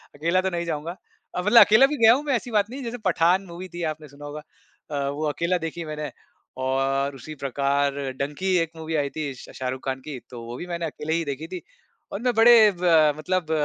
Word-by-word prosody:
अकेला 170 +5 +1
तो 190 - 0
नहीं 170 -1 -3
जाऊँगा, 165 +1 -4 0.4
अब 180 - -2
मतलब 225 +3 +7
अकेला 220 +6 +6
भी 295 +2 -2
गया 225 +1 +9
हूँ 275 +4 -1
मैं, 285 -3 +1
ऐसी 240 +1 -4
बात 210 -1 +2
नहीं 260 +3 -7
है, - - -6
जैसे 235 +1 -4
पठान 175 +4 +3
मूवी 180 +1 -8
थी, 175 0 -6
आपने 155 0 -14
सुना 145 +1 -12
होगा 145 +1 -7 0.5
अ, 140 -1 -1
वो 145 +2 -3
अकेला 170 +4 0
देखी 165 0 -5
मैंने 150 -2 -5 0.5
और 135 +1 0
उसी 135 +4 -9
प्रकार 140 +1 +1 0.3
डंकी 145 +7 -3
एक 165 -1 -1
मूवी 160 0 -4
आई 145 -2 0
थी 145 -1 -4
श 125 - -12
शाहरुख़ 130 0 -4
ख़ान 130 -1 -2
की, 140 -2 -7
तो 120 -2 -9
वो 120 +1 -7
भी 175 - -6
मैंने 170 -1 -3
अकेले 155 0 -4
ही 165 0 +1
देखी 145 +3 -5
थी 180 0 -6 0.5
और 200 - -4
मैं 250 0 +1
बड़े 235 +1 +8
अ, 170 -6 +4
मतलब 175 0 -2
160 Hz, 230 wpm, -24 LUFS, 140-185 Hz, 0.5 s, गया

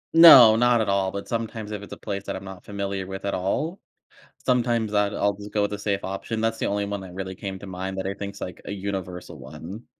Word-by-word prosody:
No, 130 -10 +11
not 120 0 +4
at 105 - -1
all, 95 -1 +2
but 100 - -6
sometimes 115 -2 -4
if 105 -1 -4
it's 105 - -11
a - - -8
place 100 -2 -4
that - - -3
I'm 95 - -7
not 95 -2 -9
familiar 100 -1 -3
with 95 +1 -6
at 100 - -1
all. 150 - -1 0.7
Sometimes 120 -4 +1
I'd 105 0 +2
I'll 100 0 +1
just 105 0 -10
go 105 - +1
with 105 - -1
the 105 - -3
safe 100 -1 -1
option, 95 +4 -4
that's 115 0 0
the - - 0
only 100 0 0
one 100 -1 -4
that 90 -2 -10
really 95 0 -5
came 95 -1 -6
to 100 - -9
mind 95 +1 -5
that 95 - -2
I 100 - -2
think 100 0 -6
is - - -12
like 90 - -6
a - - -5
universal 95 -2 -5
one. 100 +8 -9
100 Hz, 260 wpm, -25 LUFS, 95-110 Hz, 0.7 s, No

